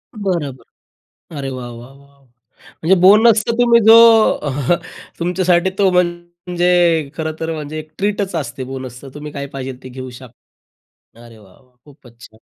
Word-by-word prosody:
बरं-बरं. 170 - -5 0.6
अरे, 135 -1 -4
वाह! 125 -2 -7
वाह! 120 +3 -12
वाह! 140 0 -22 0.6
म्हणजे 180 +4 +3
बोनसचा 215 +3 +5
तुम्ही 235 -1 +5
जो 225 +1 +9 0.5
अ, 145 +2 0 0.4
तुमच्यासाठी 180 +1 +1
तो 200 -2 +3
म्हणजे 175 -2 0
खरं 160 -1 -3
तर 165 0 -3
म्हणजे 155 0 -6
एक 155 0 -11
ट्रीटच 200 -2 -2
असते. 135 -3 -4
बोनसचं 130 0 -9
तुम्ही 150 0 -8
काय 140 -1 -6
पाहिजेल 130 -1 -7
ते 130 - -9
घेऊ 130 0 -8
शकता? 125 -1 -16 0.7
अरे, 115 -1 -15
वाह! 95 0 -20
वाह! 125 -1 -32
खूपच 130 -5 -20
छान. 110 - -15
150 Hz, 150 wpm, -17 LUFS, 130-180 Hz, 0.7 s, जो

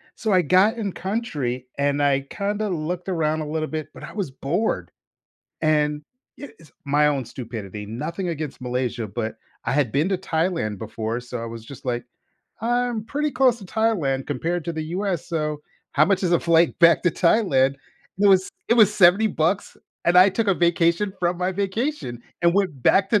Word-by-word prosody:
So 220 -2 -1
I 185 - +5
got 185 - +4
in 205 -4 -2
country, 150 - -3
and 140 0 +1
I 140 -1 +3
kinda 205 +1 -2
looked 175 +1 -3
around 160 -3 0
a 155 - -4
little 155 0 -2
bit, 155 -1 -4
but - - -12
I - - -8
was 190 -10 -3
bored. 170 +12 -2 0.7
And, 150 -1 +2 0.3
yeah 285 - -8
it's 165 - -19
my 150 +1 +3
own 140 -4 -1
stupidity, 110 -4 -7
nothing 165 - -4
against 155 -5 -5
Malaysia, 125 -2 -2
but 110 +2 -4 0.3
I - - -1
had 135 -5 +1
been 150 +6 +2
to 190 - +2
Thailand 165 - -1
before, 110 +1 -4
so 125 0 -7
I - - -4
was 115 -1 -8
just 140 - -11
like, 120 -1 -2 0.6
"I'm 240 -2 0
pretty 295 +5 -1
close 255 -3 +3
to 205 - -11
Thailand, 180 -11 0
compared 165 +4 -2
to 170 - -1
the 160 -1 -3
US, 195 -4 -2
so 150 -3 -2 0.3
how 150 - +5
much 195 0 +1
is 180 -2 +1
a 170 - +4
flight 170 0 +3
back 170 0 +6
to 175 - +3
Thailand?" 150 -7 +3 0.4
It 205 - +5
was 190 -1 +4 0.2
it 235 - +5
was 215 -3 +5
70 195 +3 +5
bucks, 180 +2 -1 0.3
and 175 - +4
I 185 - +8
took 225 +3 -1
a 195 - +4
vacation 170 +3 +2
from 175 0 +1
my 180 +1 0
vacation, 200 - -3 0.2
and 170 0 +4
went 185 -10 0
back 195 +8 +4
to 210 - +4
170 Hz, 190 wpm, -23 LUFS, 140-195 Hz, 0.7 s, I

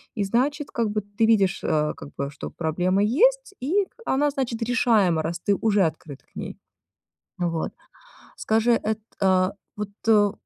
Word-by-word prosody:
И 205 - 0
значит, 275 +8 0
как 230 -3 0
бы 210 0 -1
ты 205 +2 -1
видишь, 200 -5 +3
э, 150 -2 +1
как - - -9
бы, 140 0 -2
что 145 - -8
проблема 180 +5 0
есть, - - +2
и 380 +8 +1 0.2
она, 290 +2 +2
значит, 245 -4 -3
решаема, 220 -8 +3
раз 165 +2 -3
ты 200 - +4
уже 210 -2 +2
открыт 155 -4 -4
к - - -39
ней. - - -6 0.8
Вот 170 -2 -1 0.6
скажи, 220 +2 +1
это, 220 -2 +1 0.3
э, 185 -1 +4 0.3
вот, 210 -1 -4 0.2
э, 205 -2 +5
210 Hz, 160 wpm, -24 LUFS, 180-240 Hz, 0.8 s, э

